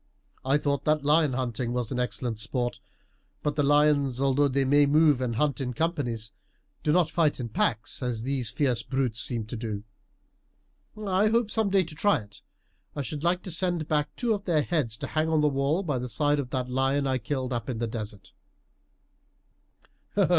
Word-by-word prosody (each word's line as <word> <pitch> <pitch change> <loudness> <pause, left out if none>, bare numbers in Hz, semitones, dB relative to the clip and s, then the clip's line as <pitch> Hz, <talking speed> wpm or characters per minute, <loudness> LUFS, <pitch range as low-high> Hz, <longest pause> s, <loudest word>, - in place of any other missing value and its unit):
"I 135 +2 +3
thought 140 -1 -1 0.2
lion 150 -1 +4
hunting 125 -1 -2
was 125 -3 -2
an 125 - -2
exciting 125 -1 -2
sport 120 +3 -2 0.6
but 150 -1 0
the 150 - +2
lions, 145 -2 +3
although 140 +1 +3
they 135 0 +1
may 145 +2 +5
move 150 -2 +4
and 120 -3 -1
hunt 145 +2 0
in 125 -2 -3
companies, 125 - -1 0.5
do 150 - +1
not 165 -1 +3
fight 160 -5 +2
in 120 -2 -4
packs, 110 +2 0
as 120 -3 -2
these 130 -3 -1
fierce 130 -6 0
brutes 130 -5 -1
seem 115 -3 -1
to 110 - -6
do. 110 -3 -4 1.1
I 205 -1 +1
hope 225 0 +1
some 220 -3 +1
day 195 -1 +3
to 165 -2 -9
try 200 +4 +3
it. 100 -4 -11 0.5
I 145 - -2
should 145 +5 -5
like 175 +1 +1
to 185 - -5
send 170 -2 0
back 150 -2 0
two 235 -2 +1
of 205 -1 -4
their 160 -5 +2
heads 145 -11 -1
to - - -5
hang 155 +1 0
on 160 -1 +3
the 150 - +4
wall 140 +6 +1
by 145 -7 -1
the 125 +1 -4
side 145 +5 +1
of 130 -3 -3
that 130 -1 -1
of 125 - -7
the - - -5
lion 135 +2 +1
I 130 -1 0
killed 130 +1 -3
up 120 +1 -3
in 125 - -2
the 115 - -1
desert." 105 -4 -6
140 Hz, 195 wpm, -27 LUFS, 120-155 Hz, 1.1 s, may